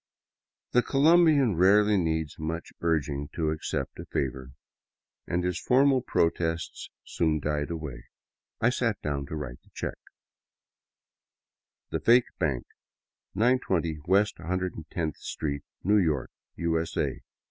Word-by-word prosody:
The 125 - +5
Colombian 145 - +4
rarely 105 +3 +5
needs 80 -5 -1
much 80 +2 -4
urging 75 -3 0
to 80 -2 0
accept 75 -3 -3
a - - -6
favor, 65 -1 -3 0.8
and 90 +1 0
his 90 -1 -1
formal 135 +1 +4
protests 80 -6 -1
soon 80 -2 0
died 75 +1 -1
away. 75 -7 -6 0.5
I 120 - +3
sat 115 -4 0
down 70 -2 -2
to 80 - -5
write 65 -5 -6
the - - -26
check: - - -4 1.9
The - - -1
Fake 120 +1 +5
Bank, 70 -8 0 0.7
920 95 - +1
West 100 +3 +3
iioth 85 -3 -3
Street, 70 -2 -4 0.2
New 105 +3 +4
York, 80 -9 +1 0.2
U. 80 -1 0
S. 80 - -6
A. - - -1
85 Hz, 125 wpm, -28 LUFS, 75-105 Hz, 1.9 s, The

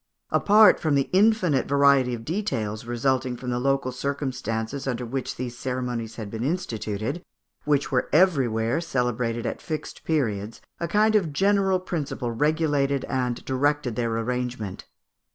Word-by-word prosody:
Apart 210 +1 +6
from 155 -4 +1
the 135 -1 0
infinite 190 - +3
variety 140 -3 +4
of 115 -1 -10
details 120 - -2
resulting 125 +1 0
from 125 0 -4
the 120 - -1
local 135 0 0
circumstances 130 -2 -3
under 125 -1 -2
which 130 +2 -4
these 125 -1 -5
ceremonies 125 -3 -3
had 105 -3 -7
been 115 +1 -4
instituted, 125 - -3 0.4
which 145 -1 +1
were 125 -2 +1
everywhere 130 -7 +2
celebrated 125 -6 -1
at - - -3
fixed 155 -1 -6
periods, 110 -9 -1 0.2
a 170 - -2
kind 215 +5 +3
of 180 -7 +2
general 195 +2 +2
principle 145 -9 -3
regulated 145 0 +1
and 125 -2 -2
directed 135 -2 0
their 115 -1 -1
arrangement. 120 -4 -3
130 Hz, 140 wpm, -25 LUFS, 120-150 Hz, 0.4 s, Apart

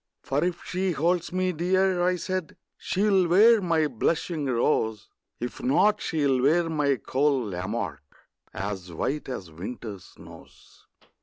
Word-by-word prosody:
For 140 +3 0
if 175 -1 -2
she 185 0 -1
holds 170 +3 0
me 185 0 0
dear, 185 +2 +1
I 180 +1 +2
said, 185 -2 -4 0.2
She'll 195 -2 +1
wear 215 +6 +6
my 165 -4 +2
blushing 150 +3 -1
rose; 115 -3 0 0.3
If 120 - -5
not, 250 -4 +3
she'll 140 -5 +1
wear 165 +5 +3
my 145 -3 +2
cold 130 -4 0
Lamarque, 90 -3 -4 0.5
As 95 -2 -5
white 135 - -3
as 95 -10 -6
winter's 100 +3 -7
snows. - - -16
155 Hz, 135 wpm, -26 LUFS, 120-180 Hz, 0.5 s, wear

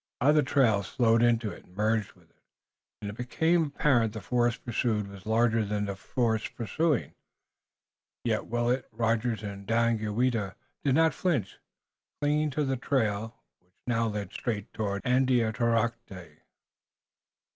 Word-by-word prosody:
Other 150 +3 +5
trails 120 -7 +2
flowed 115 -2 +3
into 115 -3 +2
and 90 - -16
merged 110 0 0
with - - -25
it, - - -39 0.6
and 100 - -3
it - - -10
became 160 +8 +1
apparent 130 -6 +2
that 110 - -5
the - - -19
force 120 -1 +1
pursued 115 -3 -1
was 100 0 -12
larger 115 0 +3
than 105 0 -1
the 100 -1 -4
force 110 +2 -1
pursuing. 140 - -1 1.1
Yet - - -1
Willet, 120 +2 0
Rogers 115 0 0
and 100 -1 -7
Daganoweda 115 -2 +1 0.3
did 135 -2 +2
not 160 +1 +4
flinch, 145 - -1 0.6
clinging 150 +1 +1
to 150 +2 -1
the 135 -1 -1
trail, 115 - -1 0.2
which 90 +1 -39
now 115 -2 +1
led 105 -3 -4
straight 105 -5 -4
toward 100 -2 -2
Andiatarocte. 115 -5 0
115 Hz, 135 wpm, -28 LUFS, 105-125 Hz, 1.1 s, Other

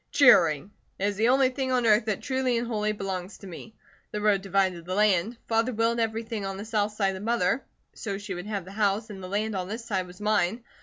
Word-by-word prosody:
"Cheering! 180 - +5 0.3
It 195 - -1
is 205 - -4
the 220 +3 +2
only 265 0 +4
thing 260 0 -2
on 250 -2 +2
earth 215 0 +4
that 215 -3 -2
truly 260 -3 0
and 235 - -1
wholly 215 -2 -1
belongs 195 -2 -5
to - - -13
me. 195 +4 -10 0.3
The 210 - -4
road 205 -2 +3
divided 190 -3 0
the 185 +2 -4
land. 210 +2 +2
Father 225 +2 +1
willed 230 +1 +1
everything 225 -1 -2
on 195 0 -4
the 205 - -6
south 215 -1 0
side 195 -2 +1
to 190 - -6
Mother, 225 +1 +1 0.3
so 200 -3 -4
she 200 -1 -6
would 180 +2 -6
have 200 -4 -3
the 190 - -10
house, 210 +1 0
and 195 -2 -8
the 185 - -7
land 210 +2 -1
on 185 -1 -2
this 225 +4 -5
side 190 -5 -1
was 180 0 -13
mine. 210 +1 +1
210 Hz, 240 wpm, -27 LUFS, 195-230 Hz, 0.3 s, Cheering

